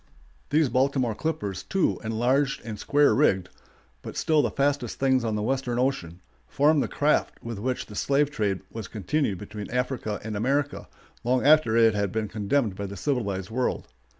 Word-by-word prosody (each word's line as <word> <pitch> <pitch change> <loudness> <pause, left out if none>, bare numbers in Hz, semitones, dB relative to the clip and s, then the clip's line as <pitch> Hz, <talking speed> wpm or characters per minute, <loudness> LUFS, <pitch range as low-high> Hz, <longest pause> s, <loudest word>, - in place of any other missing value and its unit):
] 65 - -34
These 155 0 +3
Baltimore 130 -2 +1
clippers, 105 - -3
too, 190 - 0
enlarged 125 +6 +1
and 110 -2 -6
square 145 0 +3
rigged, 95 -10 +2 0.5
but - - -8
still 155 -2 +3
the - - 0
fastest 140 -4 -1
things 130 -2 +2
on 110 -2 -1
the 105 - -2
western 130 0 -1
ocean, 110 -10 -1 0.3
formed 145 +1 +3
the - - -1
craft 150 +1 +1
with 115 -3 -5
which 125 +4 -2
the 105 - -12
slave 140 +6 +1
trade 100 -8 -1
was 110 -4 -6
continued 110 - -1
between 105 +2 -8
Africa 125 -4 -2
and 110 0 -4
America 140 +7 -1 0.4
long 125 +2 +1
after 145 -7 +5
it 115 -1 +5
had 100 -2 -1
been 110 -1 -2
condemned 105 +1 0
by 100 +1 -4
the 100 +1 -8
civilized 100 - -2
world. 125 +2 -2
120 Hz, 180 wpm, -26 LUFS, 105-140 Hz, 0.5 s, after